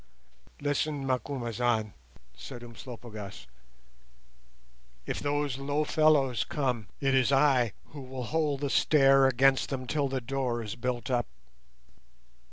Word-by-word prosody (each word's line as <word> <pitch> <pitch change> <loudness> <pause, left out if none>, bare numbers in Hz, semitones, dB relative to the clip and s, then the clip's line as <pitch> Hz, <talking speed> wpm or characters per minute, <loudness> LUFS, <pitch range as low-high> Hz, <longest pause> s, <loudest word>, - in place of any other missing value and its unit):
"Listen, 145 0 -1
Macumazahn," 120 -4 -1 0.4
said 120 - -9
Umslopogaas, 115 - -9 1.6
"if - - -3
those 145 -2 -1
low 145 +2 0
fellows 145 -6 +3
come, 125 -8 -2
it 135 -1 +1
is 130 0 +3
I 135 -5 +3 0.2
who 145 - -9
will 130 -1 -6
hold 150 +1 -1
the 140 -2 -1
stair 135 -2 +5
against 135 +1 +3
them 130 -2 -3
till 145 +2 0
the 135 0 -2
door 125 -2 -2
is 105 -1 -5
built 125 +1 -3
up. 120 -1 +1
130 Hz, 120 wpm, -29 LUFS, 120-140 Hz, 1.6 s, stair